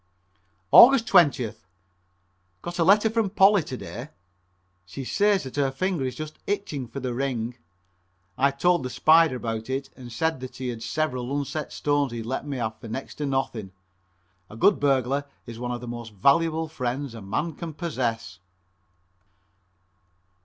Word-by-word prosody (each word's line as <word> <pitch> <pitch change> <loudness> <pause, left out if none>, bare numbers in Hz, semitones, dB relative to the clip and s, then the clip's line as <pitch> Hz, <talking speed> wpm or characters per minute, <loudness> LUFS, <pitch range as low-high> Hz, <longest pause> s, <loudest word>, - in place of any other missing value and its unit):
Aug. 255 +3 +11
20th. 165 - +2 1.0
Got 175 +1 -6
a - - +4
letter 205 +5 +5
from 220 -2 0
Polly 195 0 +5
to 130 -4 -6
day. 125 +4 -8 0.7
She 115 +9 -8
says 205 +4 +2
that 130 +1 -8
her 140 -2 +2
finger 175 +2 -2
is 130 - -3
just 155 0 -7
itching 175 -10 -3
for 125 +4 -7
the 125 -2 -3
ring. 120 -2 -2 0.8
I 140 +1 +3
told 175 +6 +2
the 125 - -4
"Spider" 160 +1 +4
about 115 -1 -4
it 135 +1 -3
and 130 - -12
he - - -8
said 160 +5 -1
that 130 0 -8
he 130 -1 -4
had 115 -2 -6
several 125 0 -2
unset 145 +2 -4
stones 145 -3 0
he'd 115 -1 -5
let 130 +4 -4
me 140 -2 -3
have 110 -2 -3
for 115 - -10
next 130 +5 -6
to 145 - -1
nothing. 120 -8 -2 0.8
A 105 - -11
good 200 - +4
burglar 140 0 +1 0.2
is 115 -1 -9
one 125 0 -4
of 120 -1 -4
the 125 - -8
most 120 -2 -7
valuable 160 - +2
friends 135 -3 -4
a 115 - -9
man 130 +12 -2
can 165 +2 -7
possess. 120 - -3
135 Hz, 165 wpm, -25 LUFS, 120-160 Hz, 1.0 s, Aug